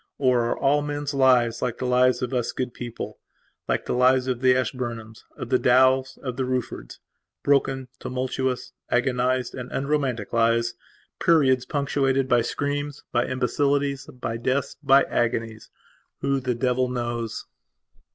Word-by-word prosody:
Or 125 -3 +2
are 120 - -1
all 145 +1 +2
men's 145 0 -3
lives 125 -4 +3
like 120 -2 -2
the 130 - -4
lives 125 0 +3
of 125 - -3
us 125 -2 0
good 125 -1 -3
peoplelike 120 -2 -6
the - - -2
lives 130 +1 +4
of 130 -2 -2
the 130 -1 +5
Ashburnhams, 120 -4 -4
of 120 - -6
the 130 - +3
Dowells, 130 +1 +3
of 125 -2 -4
the 135 - 0 1.0
Ruffordsbroken, 135 -2 +2
tumultuous, 130 0 -3 0.2
agonized, 125 +1 +1
and 125 0 -7
unromantic, 135 -7 -1
lives, 115 +1 +2 0.5
periods 135 -6 +4
punctuated 135 -2 0
by 120 -2 +4
screams, 145 +3 -3
by 120 - +1
imbecilities, 140 +2 0
by 115 -2 -5
deaths, 130 +3 -1
by 135 -1 +5
agonies? 115 -1 -2 0.5
Who 140 0 +1
the 125 -2 -2
devil 125 +1 +1
knows? 120 -2 -3
130 Hz, 140 wpm, -24 LUFS, 120-135 Hz, 1.0 s, the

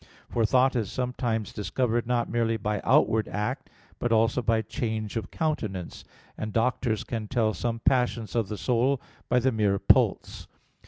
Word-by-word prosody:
For 115 -2 +2
thought 130 +2 +3
is 110 -4 -1
sometimes 120 -4 -2
discovered 120 +2 -1
not 120 -1 +1
merely 115 -1 0
by 105 -1 -2
outward 110 -1 +3
act, 105 +1 -3 0.3
but 120 - -1
also 115 +2 +3
by 115 -1 +1
change 110 -1 -3
of 115 - -3
countenance; 110 - -3 0.3
and 110 - -4
doctors 115 -1 0
can 110 -3 -4
tell 110 -2 +1
some 115 0 -3
passions 120 -4 +1
of 115 -4 +1
the 105 - -5
soul 125 +8 +1 0.3
by 125 - +3
the 130 +2 +3
mere 105 -4 +1
pulse. - - +2
115 Hz, 160 wpm, -27 LUFS, 110-125 Hz, 0.3 s, thought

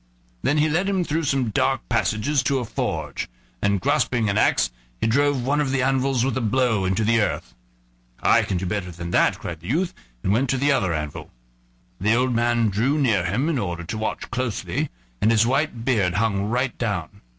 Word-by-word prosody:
Then 145 - +1
he 150 +1 +4
led 175 +6 +1
him 190 -2 +1
through 160 0 -1
some 130 -5 0
dark 135 +5 0
passages 115 +5 +1
to 140 - +1
a 125 - -2
forge, - - -3 0.3
and 100 -1 +2
grasping 120 -3 +1
an - - -2
axe - - +3 0.3
he - - 0
drove 140 +2 +2
one 145 +3 +2
of 145 - 0
the 135 -1 +1
anvils 135 -1 +1
with 135 -3 -1
a 130 - -1
blow 115 -3 +1
into 95 +4 +1
the 115 +1 +3
earth. - - -2 0.7
"I - - +5
can 95 - -2
do 90 - -3
better 90 -1 -2
than 85 0 -7
that," - - +3
cried 85 -2 -6
the 85 - -11
youth, 170 +7 0 0.3
and 95 - +2
went 130 +4 +1
to 135 - +1
the 140 +2 +2
other 95 -10 +1
anvil. 75 -2 -4 0.7
The 105 +4 +3
old 125 +1 +1
man 120 -1 +2
drew 120 +9 +1
near 110 - +2
him 115 - 0
in 160 -6 0
order 85 -4 -3
to 90 +6 -5
watch 110 - -3
closely, 125 -3 -2 0.3
and 110 - +4
his 115 0 +4
white 130 -2 0
beard 100 -9 +2
hung 100 -2 +1
right 125 +2 0
down. 105 -8 -3
120 Hz, 205 wpm, -23 LUFS, 100-135 Hz, 0.7 s, I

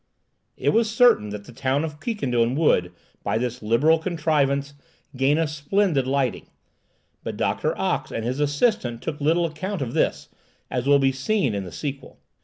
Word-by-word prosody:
It - - +1
was 225 -1 +2
certain 230 - +4
that 105 0 -7
the - - -12
town 135 +4 0
of 150 -2 -5
Quiquendone 125 - 0
would, 90 - +2 0.3
by - - 0
this 125 +1 -3
liberal 135 +10 +3
contrivance, 145 -5 0 0.4
gain 135 +3 +2
a 165 - +2
splendid 150 0 0
lighting; 135 -2 -1 0.8
but - - -5
Doctor - - -1
Ox - - -1
and 115 - -3
his 125 +3 -2
assistant 145 - 0
took 150 -2 -4
little 165 +4 +2
account 170 +2 -3
of 120 - -5
this, - - 0 0.4
as 125 +1 -2
will 140 0 +6
be 135 -1 +3
seen 135 - 0
in 100 -1 -3
the 90 - -8
sequel. 140 -2 -6
140 Hz, 170 wpm, -24 LUFS, 125-160 Hz, 0.8 s, will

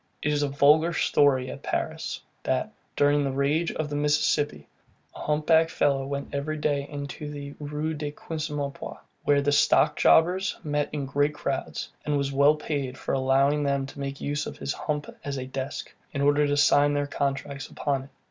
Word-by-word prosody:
It 150 - +1
is 145 - +1
a 145 - +2
vulgar 150 +4 +4
story 135 -5 +3
at - - -9
Paris, - - -3 0.2
that, - - -1 0.2
during 145 0 +3
the 135 - 0
rage 145 +5 +1
of 155 - -3
the 145 - -4
Mississippi, 145 0 +1 0.5
a - - -9
hump 150 0 -1
backed 160 0 +5
fellow 135 -3 +1
went 140 0 -4
every 150 +2 -2
day 145 -2 0
into 145 +1 -6
the 145 -1 -7
Rue 150 +2 -3
de 150 -1 -3
Quincempoix, 150 -2 -5 0.3
where 145 -1 +3
the 145 - +2
stock 145 - +4
jobbers 185 +6 +4
met 145 -2 -1
in 145 -2 -3
great 145 +2 +1
crowds, 140 -2 -3
and 150 -1 0
was 140 0 -1
well 140 +2 +5
paid 140 -4 -3
for - - -3
allowing 135 +2 +3
them 140 -1 0
to 135 - -11
make 140 0 -4
use 145 +1 -2
of - - -7
his 140 - -3
hump 150 -1 -3 0.2
as 140 -1 -3
a 130 - -4
desk, 135 +1 -5 0.2
in 140 - -2
order 145 +1 +4
to 145 0 +1
sign 145 0 +4
their 145 0 +1
contracts 140 0 -3
upon 140 -2 -1
it. - - -17
145 Hz, 190 wpm, -26 LUFS, 140-150 Hz, 0.5 s, backed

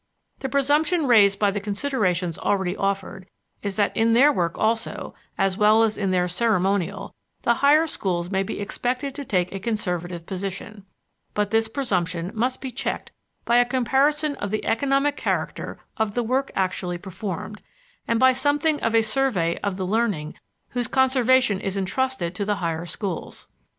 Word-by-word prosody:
The 265 - -3
presumption 295 +4 +2
raised 205 -6 +5
by 205 -1 +2
the 205 - -2
considerations 200 - -1
already 190 -2 0
offered 195 -1 -3 0.3
is 200 -2 -3
that 205 -2 +1
in 225 0 +3
their 280 +5 +6
work 170 -7 -1
also, 225 +1 -1 0.2
as 195 +1 +1
well 215 +2 +5
as 220 -1 +1
in 195 -2 -1
their 180 -1 +2
ceremonial, 195 -1 0 0.3
the - - +4
higher 300 +3 +5
schools 180 - -2
may 190 -1 +1
be 195 - -4
expected 250 +6 -2
to 285 - -6
take 180 -8 0
a 195 - -4
conservative 180 -5 -3
position; 195 +2 -6 0.5
but 210 0 0
this 225 0 +2
presumption 185 -8 -2
must 250 +3 -1
be 265 - -5
checked 270 +3 -3 0.3
by 235 - +4
a 245 - +7
comparison 275 +4 +1
of 205 - -3
the 215 +2 -2
economic 275 +4 +1
character - - -2 0.2
of 220 -3 -1
the 240 - +1
work 260 +4 0
actually 185 -2 -1
performed, 195 +2 -6 0.5
and 230 -1 +1
by 260 0 +6
something 290 +3 +1
of 225 0 +1
a 225 - +5
survey 215 -8 +1
of 200 -2 -2
the 190 - -2
learning 200 -7 0 0.4
whose 245 -2 -2
conservation 260 -5 +3
is 195 0 -3
intrusted 195 -2 -1
to 200 - -3
the 205 +1 0
higher 170 -2 -3
schools. 180 +1 -5
210 Hz, 165 wpm, -24 LUFS, 190-260 Hz, 0.5 s, a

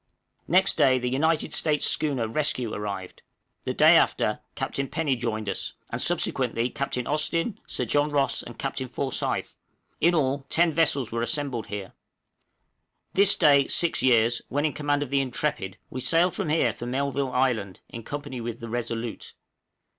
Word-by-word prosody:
Next 185 +3 +3
day 130 -1 +5
the 125 0 -2
United 160 +4 +1
States 150 -2 +2
schooner 135 -7 +2
'Rescue' 125 -2 -1
arrived; 100 -3 -5 0.4
the - - -1
day - - +7
after, - - +2 0.2
Captain 140 0 -3
Penny 150 -2 0
joined 110 -3 -3
us, 100 - -3 0.2
and - - -2
subsequently 120 +2 0
Captain 125 -3 -3
Austin, 165 +8 -1
Sir 125 - -2
John 145 +5 +1
Ross, 140 -3 +1
and 120 - -10
Captain 135 -1 -3
Forsyth, 130 +1 -2 0.4
in 170 +2 +3
all, 135 -2 0
ten 170 -1 +3
vessels 145 -7 +2
were 115 0 -2
assembled 120 -1 -1
here. 100 -2 -6 1.2
This 200 +1 +5
day 140 -4 +5
six 170 - +2
years, 120 -2 +3
when 145 +3 0
in 155 - 0
command 145 -1 0
of 140 - -9
the 140 0 +3
'Intrepid,' 125 -7 -2
we 130 - -5
sailed 170 +6 +3
from - - -3
here 160 +2 +2
for 120 - -7
Melville 135 +1 -1
Island 120 -8 0
in 115 - -8
company 145 0 -6
with 115 0 -5
the 115 - -7
'Resolute.' 115 -1 -4
135 Hz, 160 wpm, -26 LUFS, 120-150 Hz, 1.2 s, day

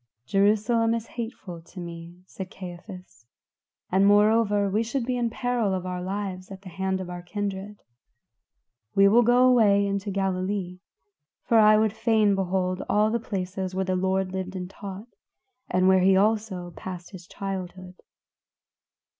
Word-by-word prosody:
"Jerusalem 215 - +2
is 230 -1 -4
hateful 225 -8 -6
to 180 +3 -13
me," 170 +1 -9
said 190 0 -8
Caiaphas, 180 - -11 0.6
"and, 190 +2 +3
moreover, 205 0 +4
we 205 +3 +1
should 235 +2 -2
be 250 0 -1
in 240 -1 0
peril 235 -4 -1
of 185 -1 -4
our 180 -1 -4
lives 190 -1 -4
at 195 0 -10
the 190 - -9
hand 190 +1 -2
of 185 - -5
our 175 0 -7
kindred. 200 +2 -5 1.1
We 195 0 +6
will 225 +4 +6
go 245 +2 +4
away 210 -5 +4
into 200 +1 -2
Galilee, 190 -1 -2 0.6
for 230 - +3
I 215 0 +7
would 215 -1 +2
fain 220 -2 +2
behold 185 -1 -1
all 210 +1 +3
the 235 - 0
places 190 -3 -4
where 190 0 0
the 185 0 0
Lord 190 0 0
lived 190 0 -5
and 180 -1 -4
taught, 195 +2 -8 0.6
and 185 +1 +2
where 190 -1 +5 0.2
also 205 -4 0
he - - -21
passed 180 -2 -8
his 185 -3 -11
childhood." 185 -2 -6
195 Hz, 155 wpm, -25 LUFS, 185-215 Hz, 1.1 s, I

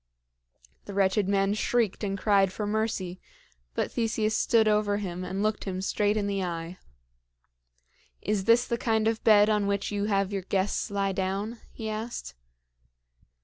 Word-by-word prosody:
The 200 - -7
wretched 195 0 +2
man 195 0 +2
shrieked 220 -1 0
and 195 -1 -1
cried 195 -2 +3
for 210 +2 -4
mercy; 205 -4 -2 0.5
but - - -1
Theseus 220 -2 0
stood 225 -1 +3
over 210 -1 +2
him 185 -3 -4
and 190 +2 -3
looked 215 0 -1
him 185 -2 -3
straight 205 +2 +1
in 205 - 0
the 200 -1 -1
eye. 170 0 -5 1.4
"Is 205 -3 -1
this 235 +2 +5
the 235 -1 -2
kind 220 -2 +1
of 225 0 -1
bed 210 -1 +6
on 210 -2 +1
which 200 0 -1
you 205 0 -1
have 200 -1 0
your 195 - -1
guests 190 +1 -1
lie 200 -1 0
down?" 195 +4 -2
he 220 - -6
asked. 220 - -5
205 Hz, 160 wpm, -27 LUFS, 195-215 Hz, 1.4 s, bed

